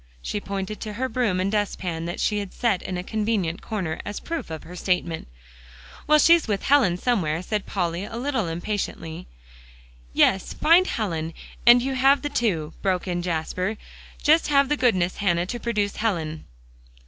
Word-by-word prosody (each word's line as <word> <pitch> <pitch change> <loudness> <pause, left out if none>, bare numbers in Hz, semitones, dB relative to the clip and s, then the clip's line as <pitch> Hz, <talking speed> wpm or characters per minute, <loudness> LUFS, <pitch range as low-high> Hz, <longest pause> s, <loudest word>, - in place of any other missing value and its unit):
She 205 - -3
pointed 200 +1 -4
to 215 - -5
her 255 +5 -1
broom 240 -8 0
and 190 +2 0
dustpan 185 -5 -2
that 175 - -4
she 210 -1 +1
had 200 -2 -7
set 225 -7 +1
in 185 - -4
a 180 - -4
convenient 210 -5 -1
corner, 185 -7 -3
as 205 - -5
proof 335 - -5
of 160 -1 -6
her 180 - -10
statement. 180 -3 -1 0.8
"Well, 305 0 +6
she's 335 +1 +5
with 205 -3 -1
Helen 255 -11 +4
somewhere," 180 -8 0
said 210 0 -2
Polly, 175 -1 -2
a 220 - -8
little 250 -6 -1
impatiently. 170 -1 -4 0.8
"Yes; 190 - +2
find 350 +4 +5
Helen, 165 -7 -2 0.3
and 240 0 +8
you 270 +1 -1
have 270 +2 +4
the 290 - -1
two," 175 - -1
broke 185 -1 0
in 175 -1 -1
Jasper. 180 +4 -2 0.5
"Just 315 +2 +4
have 280 -2 +3
the 295 - +3
goodness, 185 -10 +1
Hannah, 175 -3 +1
to 240 +6 -5
produce 210 -4 -1
Helen." 165 -8 -2
200 Hz, 170 wpm, -24 LUFS, 175-240 Hz, 0.8 s, and